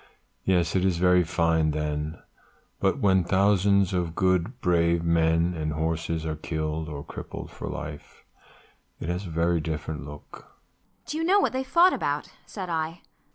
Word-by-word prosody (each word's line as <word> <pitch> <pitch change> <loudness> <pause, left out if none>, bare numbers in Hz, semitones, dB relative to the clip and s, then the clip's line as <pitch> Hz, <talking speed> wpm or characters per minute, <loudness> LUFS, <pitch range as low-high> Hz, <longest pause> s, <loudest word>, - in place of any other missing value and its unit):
Yes, 90 -2 +2
it 95 - +2
is 95 -3 +2
very 90 0 +4
fine 80 -1 +2
then; 75 +1 -2 0.6
but - - +2
when 95 -2 +3
thousands 100 +1 +3
of 85 -3 -1
good 95 +6 +1
brave 85 -2 +2
men 85 +1 +2
and 75 -2 -2
horses 80 0 -2
are 80 -1 -2
killed 80 0 -3
or 70 -2 -6
crippled - - -8
for - - -6
life, 75 0 -8 0.8
it 80 - -5
has 90 +2 -3
a - - -7
very 85 +1 +1
different 75 -1 -4
look." 75 0 -11
85 Hz, 120 wpm, -26 LUFS, 80-90 Hz, 0.8 s, very